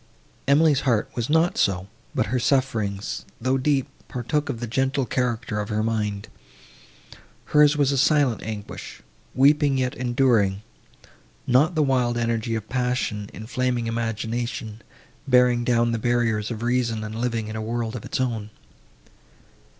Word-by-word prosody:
Emily's 145 0 +4
heart 120 -7 0
was 120 +1 -3
not 160 +3 +2
so; 95 -1 +1 0.3
but - - +2
her 130 - +2
sufferings, 115 -6 0 0.2
though 130 +3 +1
deep, 135 0 +1 0.2
partook 145 +4 -2
of 120 -5 -3
the 120 - -3
gentle 135 +3 0
character 120 -3 -1
of 105 - -3
her 110 0 0
mind. 105 -3 -2 1.2
Hers 150 0 +4
was 140 -2 +3
a 140 - +1
silent 140 -4 +3
anguish, 105 -2 -7 0.3
weeping, 140 +1 +4
yet 125 -1 0
enduring; 120 -5 +1 0.8
not 145 +8 +3
the 155 - +3
wild 125 -3 +1
energy 115 -1 -1
of 110 -1 -5
passion, 125 -5 -1
inflaming 120 +2 -2
imagination, 115 0 -3 0.5
bearing 125 -2 +4
down 120 -1 +2
the 115 - -1
barriers 115 -3 0
of 115 -1 -5
reason 120 -2 0
and 110 0 -6
living 115 -3 -1
in 110 - -6
a 110 - -3
world 115 +1 -3
of 115 - -6
its - - -3
own. 115 -5 -2
120 Hz, 145 wpm, -24 LUFS, 110-130 Hz, 1.2 s, Emily's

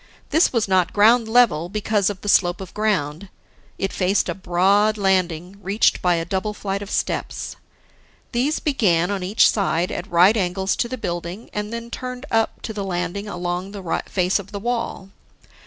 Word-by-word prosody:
This 320 - +4
was 230 -4 0
not 185 -2 +2
ground 225 +3 +5
level, 220 -9 +3
because 210 0 0
of 200 -2 -6
the - - -8
slope 175 -3 +3
of 190 -3 -9
ground; 190 -5 -1 0.5
it 195 - -2
faced 190 +2 +1
a - - 0
broad 195 +4 +2
landing, 185 -2 0
reached 200 +3 +2
by 180 -1 +3
a 165 0 -2
double 190 +4 -2
flight 200 -1 -3
of 200 - -7
steps. - - -3 0.8
These 265 +6 0
began 195 - +1
on 200 -2 -2
each 190 +5 +4
side 180 -4 0
at - - -5
right 180 +5 +5
angles 190 -1 0
to 235 - 0
the 255 - -4
building 175 +1 -5
and 210 +1 -3
then 235 0 -6
turned 250 +2 -6
up 225 0 0
to 220 - -4
the 205 -1 -4
landing 180 +2 -3
along 180 +1 -4
the 190 -5 -2
face 185 +1 +1
of 200 0 -10
the 200 - -5
wall. 230 -4 -3
195 Hz, 180 wpm, -22 LUFS, 180-215 Hz, 0.8 s, ground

